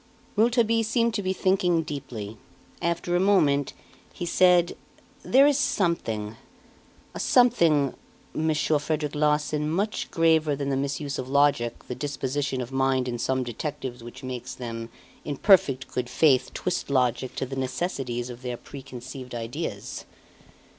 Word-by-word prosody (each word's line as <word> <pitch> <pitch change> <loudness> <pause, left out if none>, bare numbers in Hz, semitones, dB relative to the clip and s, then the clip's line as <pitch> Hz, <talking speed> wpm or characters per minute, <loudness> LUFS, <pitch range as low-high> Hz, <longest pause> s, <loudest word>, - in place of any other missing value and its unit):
Rouletabille 230 0 +3
seemed 230 +1 +1
to 210 - -1
be 185 -1 -1
thinking 185 -3 +2
deeply. 125 -8 -6 0.4
After 170 +1 -1
a - - +3
moment 155 -8 +3 0.4
he 175 - -5
said: 180 0 +4 0.5
"There 270 +2 +5
is 290 -1 +3
something 115 - -1 0.8
a - - -6
something, 165 - +4 0.4
Monsieur 155 -1 +1
Frederic 150 0 -2
Larsan, 150 0 +1
much 200 +7 -1
graver 160 -3 +3
than 140 0 -3
the 135 - +1
misuse 140 +1 -2
of 130 0 -5
logic 140 -4 +2
the - - -3
disposition 135 -1 -2
of 125 +1 -6
mind 135 -1 +1
in 120 -1 -3
some 130 +2 0
detectives 125 0 -5
which 120 +2 -10
makes 130 0 -5
them, 115 -2 -6 0.3
in 145 -2 -4
perfect 140 -10 +4
good 125 -1 -3
faith, 130 -3 +3
twist 180 -4 -2
logic 130 -1 +1
to - - -2
the 135 +1 -6
necessities 130 -2 -3
of 120 0 -10
their 125 -2 -4
preconceived 130 -2 -9
ideas. 115 0 -5
140 Hz, 140 wpm, -26 LUFS, 125-170 Hz, 0.8 s, There